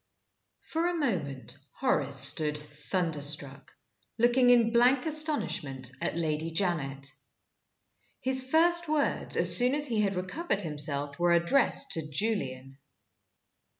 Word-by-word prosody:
FOR 330 +2 -3
a 350 - -2
moment 145 - -4 0.2
Horace 145 - 0
stood 150 +3 +4
thunderstruck, 150 -2 -3 0.5
looking 245 +2 +3
in 235 -2 +3
blank 250 +3 +3
astonishment 210 - 0
at - - -3
Lady 160 -1 -2
Janet. 145 -6 -3 1.1
His 260 0 0
first 345 +2 +2
words, 300 -2 0
as - - +5
soon 250 +2 +2
as 295 0 0
he 230 -6 -1
had 200 -2 -1
recovered 200 - -4
himself, 145 -2 -3
were 175 0 +2
addressed 170 +11 +2
to 160 -2 +2
Julian. 135 -8 -3
175 Hz, 115 wpm, -28 LUFS, -, 1.1 s, as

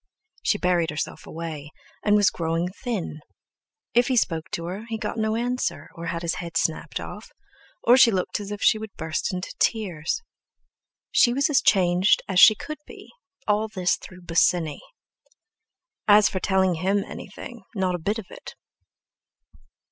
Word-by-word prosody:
She - - +1
buried 175 -2 +1
herself 150 0 -5
away, 155 -3 -6 0.3
and 210 0 +4
was 205 -1 +4
growing 165 +1 -1
thin; 195 -6 -4 0.7
if 240 +1 +4
he 260 -2 +1
spoke 165 -7 0
to 170 - -3
her 190 +6 -5
he 225 - -2
got 220 +1 -4
no 220 0 0
answer, 245 +2 -2
or 170 0 -7
had 170 0 -3
his 170 - -1
head 170 -1 -4
snapped 160 -1 -1
off, - - -8 0.5
or 245 +2 +6
she 260 - +8
looked 190 -2 -1
as 205 -1 -7
if 205 -1 -5
she 215 - +4
would 215 -2 -8
burst 160 +3 -2
into 185 0 -5
tears. 205 - 0 0.9
She 240 - +5
was 285 +3 +2
as 280 - +4
changed 185 +1 +3
as 185 -3 +2
she 215 - +9
could 305 +6 -7
be, - - -13 0.4
all 210 +1 +1
through 195 -3 -7
this 180 - +2 0.2
Bosinney. 165 -2 +1 1.3
As 210 0 +7
for 185 - -3
telling 190 -1 +2
him 195 +2 +2
about 200 - -4
anything, 240 +4 -9
not 190 -2 0
a 175 - -2
bit 205 +7 -1
of 220 - -6
it! - - -10
190 Hz, 170 wpm, -24 LUFS, 170-220 Hz, 1.3 s, she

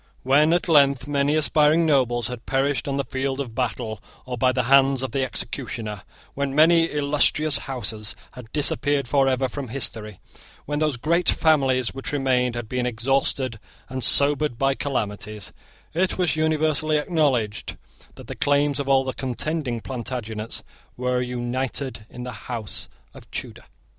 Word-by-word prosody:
When, 145 +4 +4
at 175 +1 +1
length, 140 -4 +4
many 145 +1 +1
aspiring 155 +1 +4
nobles 125 -6 +2
had 125 0 -4
perished 135 +1 0
on 140 0 -1
the 140 - 0
field 135 +1 -3
of 125 -5 -4
battle 115 -3 -3 0.2
or 125 -1 -4
by 125 +2 +3
the 125 0 0
hands 135 +1 +4
of 130 - -3
the 135 +2 0
executioner, 115 -5 -4 0.3
when 140 -1 -2
many 165 +2 +6
illustrious 150 +1 +2
houses 110 -5 -2 0.2
had 120 -3 -12
disappeared 145 -2 +1
forever 135 -1 +2
from 140 +1 -6
history, 110 -5 -4 0.5
when 145 +1 -2
those 155 -4 0
great 170 +8 +1
families 135 -6 +2
which 135 +2 -5
remained 125 -3 +1
had 120 -2 -4
been 125 +1 -1
exhausted 130 0 0 0.3
and 130 -1 -4
sobered 145 -2 +4
by 135 +1 +2
calamities, 105 -7 -4 0.4
it 185 +3 0
was 175 -5 +1
universally 155 -1 +1
acknowledged 145 - 0 0.4
that - - -11
the - - -6
claims 145 0 +1
of 140 -1 -3
all 135 -1 +4
the 130 -1 -3
contending 130 -1 -2
Plantagenets 115 -3 -5 0.3
were 125 0 0
united 125 -1 -3
in 125 - -8
the 125 - -5 0.2
house 115 -4 -4 0.2
of - - -15
Tudor. - - -7
135 Hz, 155 wpm, -23 LUFS, 125-145 Hz, 0.5 s, many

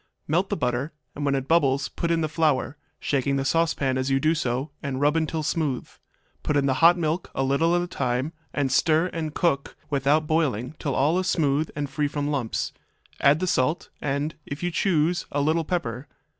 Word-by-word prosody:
Melt 175 +6 +1
the - - -1
butter, 125 +2 -1 0.2
and 145 - -5
when 140 -1 +2
it 135 0 -2
bubbles 140 -4 +3
put 170 - -3
in 165 -1 +2
the 155 - +1
flour, 150 -3 +1 0.2
shaking 140 0 0
the 135 0 -1
saucepan 140 -4 +1
as 130 +1 -1
you 135 0 +2
do 155 +3 +3
so, 135 -2 -2
and 140 -3 -3
rub 155 +3 +2
till 160 -1 -3
smooth. 150 -4 -1 0.5
Put 150 - 0
in 140 - +2
the 135 - +2
hot 170 +2 +7
milk, 165 +1 -1
a 135 - +1
little 160 +6 +2
at 175 - +1
a - - -4
time, 130 0 -1 0.2
and 140 -3 -1
stir 160 +6 +3
and 155 -2 -4
cook 150 -6 0 0.2
without 145 +2 +2
boiling 145 -5 0
till 140 -3 -2
all 155 +7 +2
is 185 - -2
smooth 150 -3 +1
and 145 -1 -2
free 145 +2 -1
from 145 0 -2
lumps. 130 -6 -2 0.5
Add 145 +4 +4
the - - +1
salt, 155 0 0
and, 145 +2 -1
if 140 +4 -7
you 175 - 0
choose, 170 -1 +1
a 145 - 0
little 155 +3 +2
pepper. 140 -6 -3
150 Hz, 205 wpm, -25 LUFS, 135-165 Hz, 0.5 s, hot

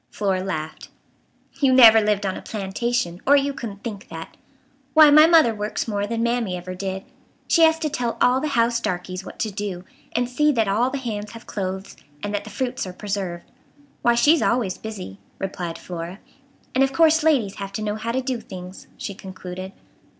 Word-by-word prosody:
Flora 190 -3 -1
laughed. 160 -5 -5 0.7
"You 275 -2 +4
never 230 -4 +8
lived 210 -1 +1
on 190 - -1
a - - -7
plantation, 205 -2 -2
or 285 - +7
you 280 0 +2
couldn't 205 -6 -7
think 215 -1 -6
that. - - -8 0.6
Why, 310 -2 +9
my 305 +2 +8
mother 320 -9 +6
works 210 +2 -3
more 205 -2 -1
than 230 +1 -1
Mammy 235 -6 0
ever 180 +1 -7
did. 190 +1 -4 0.4
She 335 - +3
has 320 0 +6
to 320 -1 -2
tell 245 -5 -2
all 255 +1 +3
the 305 - -1
house 235 0 +3
darkies 185 -3 -3
what - - -10
to 215 - -2
do, 195 -3 -4 0.3
and 245 0 +1
see 300 +5 +2
that 225 -4 +1
all 225 +6 +2
the 280 - -3
hands 215 -5 -5
have 230 0 -11
clothes, 190 -1 -5 0.3
and 205 - -3
that 205 0 -2
the - - -8
fruits 245 0 -3
are 185 - -7
preserved. 190 -3 -4 0.6
Why, 240 0 +3
she's 295 +6 +5
always 235 -6 +1
busy," 195 - -7 0.2
replied 175 -3 -4
Flora. 175 +1 -7 0.6
"And 260 - +4
of 270 - +1
course 320 +1 +5
ladies 265 -11 +2
have 195 -1 -5
to 215 - -3
know 210 -1 -1
how 225 +2 -3
to 260 +2 -1
do 255 -3 -2
things," 185 -1 -10
she 200 - -5
concluded. 185 0 -8
215 Hz, 195 wpm, -23 LUFS, 190-250 Hz, 0.7 s, Why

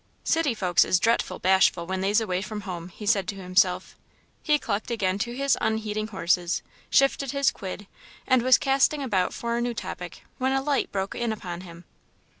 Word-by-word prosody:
"City 325 -7 +1
folks 180 -4 +3
is 180 - +2
dretful 230 +3 +1
bashful 185 -2 +3
when 190 +1 -3
they's 200 +3 +3
away 185 -5 -1
from 210 +1 -5
home," 180 -3 -6
he 210 +4 -10
said 195 -2 +2
to 200 - -3
himself. 185 -1 +1 0.5
He 300 -2 +3
clucked 215 -6 -3
again 200 -5 0
to 235 +3 -2
his 275 +1 +2
unheeding 215 -1 -1
horses, 180 -3 0 0.3
shifted 275 -1 +2
his 280 -1 +2
quid, 195 +1 -7 0.4
and 255 -2 +3
was 255 +1 +6
casting 275 +2 +2
about 195 -8 +1
for 235 0 -3
a - - -1
new 240 0 -2
topic - - -7 0.2
when 260 +1 +1
a 270 - +1
light 285 -1 0
broke 195 0 -2
in 235 -1 -2
upon 180 -5 -6
him. 170 -1 -12
210 Hz, 190 wpm, -26 LUFS, 185-245 Hz, 0.5 s, was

